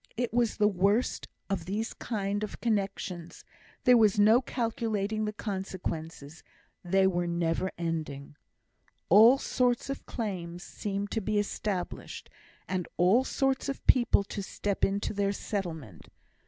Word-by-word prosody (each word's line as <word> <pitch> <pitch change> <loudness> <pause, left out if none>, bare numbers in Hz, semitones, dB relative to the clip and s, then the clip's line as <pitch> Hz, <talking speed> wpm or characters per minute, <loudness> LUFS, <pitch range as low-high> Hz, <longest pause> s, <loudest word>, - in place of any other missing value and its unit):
It 245 -1 -1
was 235 -2 +1
the 210 - +4
worst 200 +4 +1 0.2
of 195 -5 -2
these 210 +5 -3
kind 205 -2 -2
of 210 - -6
connexions, 195 -6 -3 0.4
there 250 -1 +7
was 210 -2 +4
no 220 +4 +6
calculating 220 -4 -2
the 210 - -1
consequences; 175 -7 -5 0.4
they 190 +2 +3
were 175 -2 +1
never 170 +2 0
ending. 155 -4 -4 0.7
All 225 +8 +8
sorts 250 -1 0
of 275 - -7
claims 180 -6 -4
seemed 200 0 -4
to 225 - -1
be 215 +1 -1
established, 205 -2 -3 0.4
and 185 -2 -2
all 190 +9 +4
sorts 270 +1 0
of 275 - -5
people 240 -5 +4
to 200 +1 -5
step 200 +1 -3
in 195 +1 +2
to - - -2
their 200 -1 +1
settlement. 160 - -5
200 Hz, 140 wpm, -29 LUFS, 175-220 Hz, 0.7 s, All